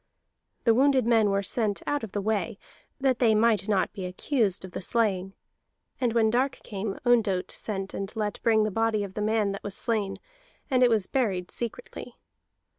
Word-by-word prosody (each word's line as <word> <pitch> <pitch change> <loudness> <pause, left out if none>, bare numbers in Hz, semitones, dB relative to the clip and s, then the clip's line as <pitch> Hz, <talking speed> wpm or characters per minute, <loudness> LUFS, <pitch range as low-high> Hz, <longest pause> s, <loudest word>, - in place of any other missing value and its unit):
The 230 - +5
wounded 265 0 +3
men 225 -3 +4
were 200 0 +1
sent 210 0 -1
out 290 -4 -1
of 220 - -6
the 205 - -2
way, 205 -3 -1 0.4
that 265 -2 +1
they 225 -3 +4
might 215 -2 +2
not 195 -3 +1
be 190 - -5
accused 195 0 0
of 185 - -11
the - - -5
slaying; 195 -3 0 0.7
and 245 -3 +1
when 225 -2 +3
dark 260 +3 +1
came 200 -1 -4
Ondott 215 -7 +2
sent 195 -3 -5
and 195 0 -4
let 210 -2 -3
bring 220 -2 +3
the 215 - -1
body 225 0 +1
of 195 -2 -7
the 210 - -4
man 215 -1 +1
that 195 - -6
was 200 -1 -4
slain, 210 -4 -1 0.5
and 255 -1 +3
it 250 - +6
was 220 -4 +2
buried 190 -9 -1
secretly. 235 - -6
215 Hz, 190 wpm, -27 LUFS, 195-235 Hz, 0.7 s, it